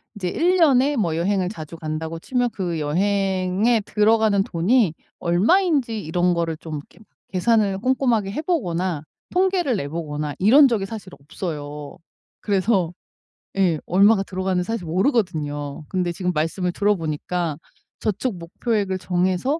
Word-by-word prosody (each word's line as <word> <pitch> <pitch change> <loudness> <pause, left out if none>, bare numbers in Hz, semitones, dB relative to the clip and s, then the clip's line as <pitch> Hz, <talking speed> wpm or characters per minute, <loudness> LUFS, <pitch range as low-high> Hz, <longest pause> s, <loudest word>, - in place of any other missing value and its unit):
이제 185 -3 -3
1 360 - +2
년에 285 -3 +4
뭐 170 -9 0
여행을 185 +1 0
자주 160 -6 -8
간다고 160 +1 -4
치면 245 +4 0
그 175 -4 -2
여행에 195 +6 +1
들어가는 210 -2 +3
돈이 190 +2 +2 0.3
얼마인지 235 - +2
이런 175 +3 +1
거를 165 -1 -1
좀 160 -1 -7
이렇게 145 - -13 0.3
계산을 200 0 +2
꼼꼼하게 240 -5 +1
해보거나 185 - -1 0.3
통계를 360 -7 +2
내보거나 150 -1 -4
이런 270 +9 +7
적이 215 -5 0
사실 205 -3 -8
없어요. 150 -1 -6 0.4
그래서 190 -4 +1 0.6
예 175 -6 +2
얼마가 195 +3 +4
들어가는지 185 -1 -1
사실 225 -6 -3
모르거든요. 155 - -1
근데 180 -2 -1
지금 180 +1 -2
말씀을 175 +3 -1
들어보니까 170 -4 -1 0.4
저축 215 0 -2
목표액을 195 +3 -2
정해서 185 - 0
190 Hz, 320 characters per minute, -22 LUFS, 165-225 Hz, 0.6 s, 이런